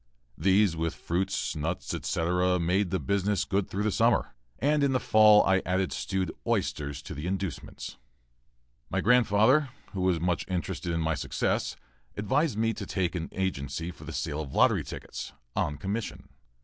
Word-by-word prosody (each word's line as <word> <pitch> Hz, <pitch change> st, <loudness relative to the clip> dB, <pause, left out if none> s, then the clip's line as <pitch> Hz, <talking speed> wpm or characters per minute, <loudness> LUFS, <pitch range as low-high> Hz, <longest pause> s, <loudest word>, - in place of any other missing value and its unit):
These, 95 Hz, -2 st, +3 dB
with 80 Hz, 0 st, -2 dB
fruit, 90 Hz, +3 st, -1 dB, 0.2 s
nuts, 80 Hz, +4 st, -3 dB
etc., 90 Hz, +2 st, +1 dB
made 90 Hz, +3 st, +1 dB
the 95 Hz, -, 0 dB
business 100 Hz, 0 st, 0 dB
good 100 Hz, 0 st, 0 dB
through 100 Hz, +2 st, -2 dB
the 110 Hz, -, +1 dB
summer, -, -, +2 dB, 0.2 s
and 145 Hz, +1 st, +2 dB
in 140 Hz, -1 st, +3 dB
the 130 Hz, -, +2 dB
fall 110 Hz, -2 st, +6 dB
I 95 Hz, +1 st, +3 dB
added 95 Hz, +1 st, 0 dB
stewed 95 Hz, -2 st, -2 dB, 0.2 s
oysters 70 Hz, -1 st, -1 dB
to -, -, -7 dB
the 75 Hz, +4 st, -5 dB
inducements. 95 Hz, -4 st, -4 dB, 0.9 s
My -, -, 0 dB
grandfather, 125 Hz, +4 st, +4 dB, 0.2 s
who 95 Hz, -, -3 dB
was 90 Hz, -2 st, +2 dB
much 85 Hz, +1 st, 0 dB
interested 90 Hz, 0 st, -3 dB
in 85 Hz, 0 st, 0 dB
my 80 Hz, 0 st, +1 dB
success, 75 Hz, -, -1 dB, 0.4 s
advised 130 Hz, +4 st, +1 dB
me 115 Hz, +1 st, +1 dB
to -, -, -6 dB
take 90 Hz, -3 st, -1 dB
an 85 Hz, -2 st, -4 dB
agency 80 Hz, -3 st, -3 dB
for -, -, -13 dB
the -, -, -6 dB
sale 80 Hz, -1 st, -2 dB
of 70 Hz, -4 st, -7 dB
lottery -, -, +4 dB
tickets, -, -, -7 dB, 0.2 s
on 75 Hz, 0 st, 0 dB
commission. 100 Hz, +8 st, -4 dB
95 Hz, 165 wpm, -28 LUFS, 85-105 Hz, 0.9 s, fall